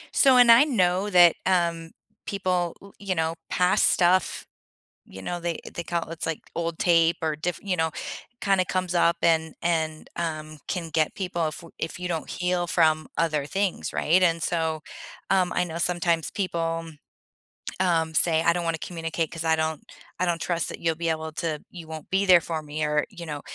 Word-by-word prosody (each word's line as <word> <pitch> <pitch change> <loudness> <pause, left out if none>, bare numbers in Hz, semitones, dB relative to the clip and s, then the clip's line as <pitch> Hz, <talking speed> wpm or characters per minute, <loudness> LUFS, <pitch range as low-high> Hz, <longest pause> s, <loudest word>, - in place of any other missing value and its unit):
So 265 -2 +6
and 245 -1 +8
I 235 +4 +8
know 195 -7 +1
that, 175 -3 +7
um, 170 -3 +1 0.4
people, 180 -3 -1
u 200 0 -14
you 195 -2 -2
know, 160 0 0 0.2
pass 180 0 +2
stuff, 180 0 +2 0.6
you 95 - -11
know, 175 - -4
they 170 -1 -2 0.2
they 170 - -3
call 170 0 -3
it's 165 -1 -5
like 165 -2 -2 0.2
old 170 -1 -2
tape 170 -1 +3
or 155 -2 -1
diff 165 +2 -3
you 190 -3 -1
know, 160 0 +1 0.5
kinda 195 -2 +2
comes 185 -1 -2
up 170 0 +3
and 160 -1 +2
and, 160 -2 -1
um, 155 -2 -4
can 175 -3 -3
get 155 -1 0
people 180 -4 -2
if - - -6
w 165 - -13
if 165 +4 -5
you 180 - -3
don't 165 -2 -3
heal 180 -1 -1
from 155 -2 +2
other 155 -3 +1
things, 195 +5 -2
right? 180 +4 +3
And 165 -2 +2
so, 160 -2 -1 0.5
um, 185 -2 +2
I - - +2
know 165 -1 -7
sometimes 170 -1 0
people, 165 -4 -2 1.0
um, 165 -3 +1
say, 160 0 +3
"I - - +4
don't 175 0 -2
wanna 165 -1 -1
communicate 165 -1 -3
'cause 165 -1 -5
I 160 0 +3
don't 160 -1 -2 0.4
I 180 - +2
don't 170 -2 -1
trust 170 -1 -1
that - - -7
you'll 165 -1 0
be 165 0 -2
able 160 0 -2
to 155 -2 -3
you 170 -3 -10
won't 160 -1 -8
be 195 +1 +1
there 180 -3 +7
for 160 -1 -3
me," 150 +1 -4
or 150 0 +1
you 175 -4 -9
know, 150 -2 -5
170 Hz, 195 wpm, -25 LUFS, 160-180 Hz, 1.0 s, and